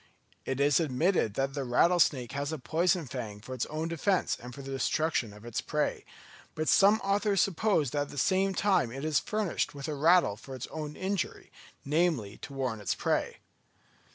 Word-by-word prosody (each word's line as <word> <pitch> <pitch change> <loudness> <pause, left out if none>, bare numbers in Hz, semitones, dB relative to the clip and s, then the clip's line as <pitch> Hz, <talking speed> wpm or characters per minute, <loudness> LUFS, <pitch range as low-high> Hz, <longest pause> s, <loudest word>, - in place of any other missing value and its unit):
It 135 0 -2
is 145 +1 +4
admitted 155 - +1
that 135 0 -1
the 140 -1 -2
rattlesnake 135 0 +3
has 140 +2 -3
a 160 - -3
poison 170 +4 +1
fang 115 -5 -6
for 125 +5 -8
its 125 - -2
own 155 +2 -3
defence 170 +3 0
and 125 +1 -8
for 140 +3 -9
the 135 - -7
destruction 135 -2 0
of 105 +2 -14
its 120 0 -3
prey; 150 -1 -2 0.5
but 155 0 -2
some 205 +1 +5
authors 200 0 +1
suppose 185 - +2
that 145 - 0
at - - -17
the - - -10
same 190 +7 +2
time 195 - +2
it 135 +4 -5
is 155 -2 +2
furnished 210 -8 -2
with 140 0 -6
a 155 - -2
rattle 155 - +4
for 130 +4 -9
its 130 - -5
own 150 -1 -5
injury, 190 -1 -3 0.3
namely, 145 - 0
to - - -9
warn 130 -5 -3
its 100 - -1
prey. - - -1
150 Hz, 190 wpm, -30 LUFS, 130-175 Hz, 0.5 s, some